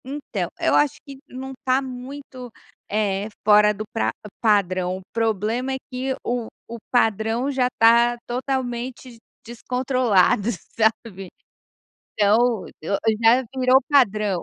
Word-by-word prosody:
Então, 280 +3 -4
eu - - +1
acho 295 -2 +3
que 275 -2 -11
não 265 +1 -7
tá 260 0 +2
muito, 255 -1 -9 0.4
eh, 200 -1 -1 0.2
fora 210 0 +6
do 210 +1 -6
pra 225 - 0 0.3
padrão, 185 -4 +1
o - - -10
problema 225 +3 -1
é - - -2
que 260 +1 -2
o 240 -2 -2 0.2
o 235 - -7
padrão 225 +2 +1
já 260 -2 +1
tá 235 +1 +5
totalmente 250 -1 -4 0.3
descontrolado, 240 -4 +1 0.3
sabe. 220 -4 -1 0.9
Então 210 0 +4 0.3
o - - -10
o 195 +6 -4 0.2
já 240 +3 +5
virou 255 +1 +5
padrão. 210 -9 +2
235 Hz, 125 wpm, -22 LUFS, 210-255 Hz, 0.9 s, fora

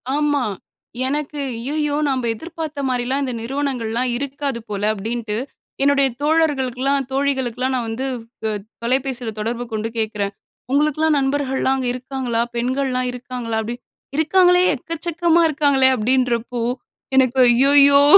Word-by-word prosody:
ஆமா 290 -1 +1 0.7
எனக்கு, 295 +1 -2 0.2
ஐய்யயோ 290 +5 -1
நம்ப 260 -2 0
எதிர்பார்த்த 310 0 -6
மாதிரிலாம் 255 +2 0
இந்த 255 -2 -2
நிறுவனங்கள்லாம் 250 -2 -1
இருக்காது 280 -2 -3
போல 205 -1 -3
அப்படின்ட்டு. 220 +1 -3 0.5
என்னுடைய 280 -1 +4
தோழர்களுக்கெல்லாம், 275 -3 +1
தோழிகளுக்கெல்லாம் 265 -2 0
நான் 240 -3 -2
வந்து 235 +4 -3 0.4
அ - - 0 0.3
தொலைபேசியில 250 -1 -1
தொடர்பு 235 +3 -2
கொண்டு 220 +1 -2
கேட்குறேன், 210 -2 -1 0.4
"உங்களுக்கெல்லாம் 305 +2 +2
நண்பர்கள்லாம் 270 -1 0
அங்க 255 -2 -2
இருக்காங்களா, 250 -2 -2
பெண்கள்லாம் 255 +1 0
இருக்காங்களா?" 245 -2 -4
அப்டி 235 +2 -4 0.4
"இருக்காங்களே, 360 +3 +5
எக்கச்சக்கமா 335 +3 +1
இருக்காங்களே!" 280 -3 +4
அப்டின்றப்போ, 245 0 0 0.6
எனக்கு 260 0 +4
ஐய்யயோ! 280 +3 +6
265 Hz, 110 wpm, -20 LUFS, 240-285 Hz, 0.7 s, ஐய்யயோ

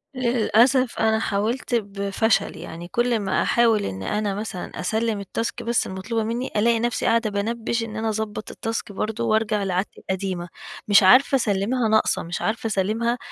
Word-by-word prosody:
للأسف 245 +1 +2
أنا 220 0 +2
حاولت 225 +4 -1
بفشل. 200 +1 0
يعني 170 +1 -8
كل 240 +3 +1
ما 195 -2 0
أحاول 225 -3 +3
إن 95 0 -5
أنا 210 - -1
مثلًا 205 -3 -6
أسلّم 220 +2 -1
التاسك 215 +4 -4
بس 235 0 0
المطلوبة 220 +4 -3
منّي، 235 +4 -3
ألاقي 230 +2 +3
نفسي 240 0 -1
قاعدة 230 -1 +2
بانبّش 225 +3 -2
إن 220 -1 -7
أنا 220 0 -1
أضبّط 215 0 -4
التاسك 225 -2 -4
برضه، 220 +3 -3
وارجع 215 -2 +1
لعادتي 185 +1 -2
القديمة. 190 -2 -3 0.4
مش 205 -1 +6
عارفة 255 +8 +6
أسلّمها 225 +1 +1
ناقصة، 220 0 +2
مش 170 +1 -5
عارفة 225 +1 -1
أسلّمها 220 +4 0
220 Hz, 160 wpm, -23 LUFS, 200-230 Hz, 0.4 s, مش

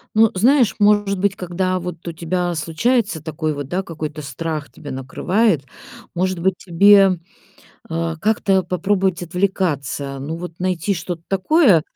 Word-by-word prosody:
Ну, 220 0 +5
знаешь, 245 +4 +4
может 205 -1 +3
быть, 200 0 +1
когда 185 +1 -1
вот 180 -1 -7
у 170 - -3
тебя 175 +2 -2
случается 175 - 0
такой 155 0 -2
вот, 145 -2 -6
да, 185 +4 -1
какой-то 155 -2 -6
страх 150 +2 -4
тебя 145 - -10
накрывает, 160 - 0 0.5
может 185 0 0
быть, 190 +2 +2
тебе, 195 0 +5 0.7
э, 165 0 -2
как-то 195 -2 +2
попробовать 185 +1 0
отвлекаться, 160 -7 -2
ну, 150 +5 -5
вот, 170 -1 -8
найти 185 +1 0
что-то 175 -2 -4
такое, 195 - +4
180 Hz, 140 wpm, -20 LUFS, 160-195 Hz, 0.7 s, Ну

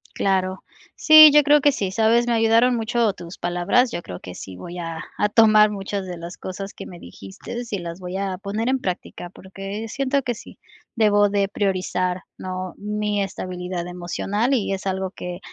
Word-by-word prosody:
Claro. 190 -1 0 0.3
Sí, 310 -1 +9
yo 295 - +8
creo 295 0 +5
que 290 - +5
sí, 195 -8 -3
¿sabes? 225 +4 +2
Me 240 - +1
ayudaron 230 +2 +3
mucho 230 -1 0
tus 175 0 -10
palabras, 175 +9 +1
yo 175 - -4
creo 90 - -8
que 90 -1 -10
sí 95 - -9
voy 170 - -8
a 165 -2 -5 0.2
a 210 - +1
tomar 215 -1 +6
muchas 195 -1 -4
de 180 -1 -6
las 170 +1 -9
cosas 195 +2 -7
que - - -9
me 175 - -11
dijiste 95 - -9
y 200 - -2
las 170 +1 -7
voy 180 +1 -5
a 195 -2 -3
poner 210 +3 -3
en 265 - +1
práctica, 180 -3 -5
porque 195 +4 -8
siento 275 +3 -1
que 245 -2 -2
sí, - - -13 0.4
debo 205 -2 +4
de 200 -1 +1
priorizar, 185 -2 -1
¿no? 185 0 -5
Mi 210 0 -2
estabilidad 180 -2 -5
emocional 195 +7 -2
y 210 -6 0
es 195 +1 -5
algo 190 0 -2
que 180 -2 -7
195 Hz, 190 wpm, -22 LUFS, 180-225 Hz, 0.4 s, Sí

